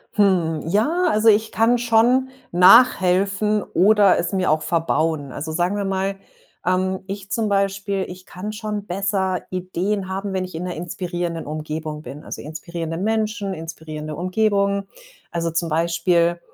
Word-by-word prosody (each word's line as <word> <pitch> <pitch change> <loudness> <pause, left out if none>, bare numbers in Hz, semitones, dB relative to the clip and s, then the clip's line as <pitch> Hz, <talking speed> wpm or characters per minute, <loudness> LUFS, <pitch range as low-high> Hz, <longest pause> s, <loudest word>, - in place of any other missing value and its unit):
Hm, 180 -6 +2
ja, 295 - +1
also 215 +2 +2
ich 220 +1 +3
kann 235 +2 +3
schon 240 +3 +3 0.2
nachhelfen 195 +1 +5
oder 200 +1 +4
es 175 - -2
mir 185 -4 +1
auch 155 0 +2
verbauen. 155 -3 0
Also, 160 +2 -5
sagen 175 +4 0
wir 205 -1 -2
mal, 195 0 -1 0.5
ähm, 185 +1 0
ich 195 0 -7
zum 220 -2 0
Beispiel, 195 -1 0
ich 185 +1 -11
kann 205 +4 -6
schon 210 -2 -4
besser 190 -1 -1
Ideen 185 +2 -2
haben, 195 +1 -4
wenn 185 -1 -1
ich 185 - -11
in 170 +3 -4
'ner 180 - -4
inspirierenden 175 -1 -4
Umgebung 155 0 -5
bin. 145 +1 -9
Also, - - -7
inspirierende 165 +1 -5
Menschen, 215 -1 -1
inspirierende 155 -2 -7
Umgebung. 200 +2 +1 0.5
Also, 170 -1 -1
zum 165 +1 -1
Beispiel 170 +1 +1
185 Hz, 150 wpm, -21 LUFS, 170-205 Hz, 0.5 s, nachhelfen